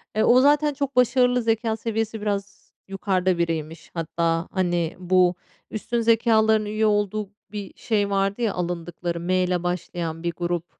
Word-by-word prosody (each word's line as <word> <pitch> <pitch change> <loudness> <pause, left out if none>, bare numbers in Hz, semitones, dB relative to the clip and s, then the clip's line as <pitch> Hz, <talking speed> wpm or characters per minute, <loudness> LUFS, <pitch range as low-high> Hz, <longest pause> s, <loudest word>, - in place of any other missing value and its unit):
e, 215 - +3
o 250 +1 +6
zaten 295 +1 +4
çok 280 -1 -3
başarılı, 250 0 +3
zekâ 225 0 0
seviyesi 225 -1 -3
biraz 200 -1 -4 0.2
yukarıda 190 -2 0
biriymiş. 165 -1 -3
Hatta, 165 0 -1
hani, 175 -3 0
bu 180 0 +3 0.4
üstün 235 +2 -2
zekâlıların 220 -1 +3
üye 215 +1 0
olduğu 210 -1 0 0.2
bir 205 -3 -6
şey 205 -3 0
vardı 195 +3 0
ya, 220 -4 +1
alındıkları 175 -1 -3
M 180 +2 0
ile 180 -1 -1
başlayan 175 -2 -3
bir 170 - 0
grup, 175 0 -2
200 Hz, 150 wpm, -24 LUFS, 175-225 Hz, 0.4 s, o